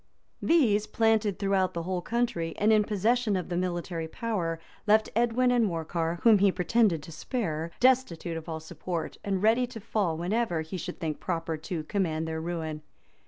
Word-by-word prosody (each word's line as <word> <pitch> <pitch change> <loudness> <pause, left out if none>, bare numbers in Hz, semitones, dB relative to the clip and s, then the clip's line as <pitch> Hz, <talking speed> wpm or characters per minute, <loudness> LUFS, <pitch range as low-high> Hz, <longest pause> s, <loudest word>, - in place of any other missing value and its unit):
] - - -44
These, 215 -9 +3
planted 220 -3 +2
throughout 195 -2 +1
the 170 - -2
whole 180 0 -2
country, 175 -7 -1
and 215 +2 +4
in 215 -1 +5
possession 215 +2 +1
of 180 -2 -3
the 175 - -2
military 175 -2 -2
power, 175 -5 -2 0.3
left 215 +1 +4
Edwin 240 +2 +3
and 245 -1 +3
Morcar, 165 -2 -1
whom 225 -3 +7
he 200 0 +5
pretended 185 -3 +2
to 165 - -10
spare, 165 - -3
destitute 245 -10 +2
of 165 +1 -6
all 160 -1 -3
support, 165 +1 -5
and 195 -1 -1
ready 230 +3 +4
to 240 -2 -8
fall 195 -6 -1
whenever 180 0 0
he 160 +4 -7
should 180 0 -5
think 155 -3 -3
proper 165 -2 -2
to 160 +1 -5
command 160 -2 -1
their 160 0 -3
ruin. 160 -2 -4
185 Hz, 180 wpm, -28 LUFS, 165-220 Hz, 0.3 s, whom